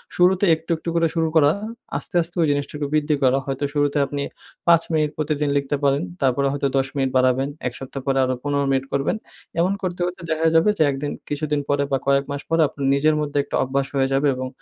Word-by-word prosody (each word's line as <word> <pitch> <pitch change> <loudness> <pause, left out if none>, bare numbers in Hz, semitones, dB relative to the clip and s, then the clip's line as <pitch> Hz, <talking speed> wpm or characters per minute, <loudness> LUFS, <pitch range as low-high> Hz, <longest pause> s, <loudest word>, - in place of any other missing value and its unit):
শুরুতে 185 +2 +4
একটু, 160 +2 -16
একটু 165 - -5
করে 165 0 +3
শুরু 165 -1 +2
করা, 150 -2 +6 0.5
আস্তে, 145 - -6
আস্তে 170 +1 -5
ওই 160 - +3
জিনিসটুকু 145 +1 -2
বৃদ্ধি 150 0 +2
করা। 130 +1 +4
হয়তো 135 +1 -2
শুরুতে 145 0 +1
আপনি 140 +1 -3 0.4
৫ 170 -1 +6
মিনিট 155 -1 +1
প্রতিদিন 150 -1 -1
লিখতে 140 0 -1
পারেন। 140 0 +3 0.2
তারপরে 135 +1 +2
হয়তো 140 0 0
১০ 135 0 +1
মিনিট 135 -2 +1
বাড়াবেন, 130 +1 +2 0.2
১ 125 - -4
সপ্তাহ 135 +1 -6
পরে 135 -1 +1
আরো 130 0 +1
১৫ 145 -1 0
মিনিট 135 0 +1
করবেন। 140 +7 +1 0.4
এমন 180 +3 +2
করতে, 180 -1 -3
করতে 180 -1 -5
দেখা 160 +1 +2
যাবে 165 +6 +5
যে - - +4
১ 140 - -1
দিন 145 - -2 0.2
কিছুদিন 150 0 -1
পরে 145 0 +2
বা 135 - +3
কয়েক 140 0 +3
মাস 140 - -3
পরে 165 0 +3
আপনার 140 0 -5
নিজের 155 +2 +3
মধ্যে 145 -1 -3
একটা - - -5
অভ্যাস 135 +1 -1
হয়ে 135 -1 +2
যাবে 140 +2 +2
এবং 130 0 -4
145 Hz, 220 wpm, -22 LUFS, 135-155 Hz, 0.5 s, করা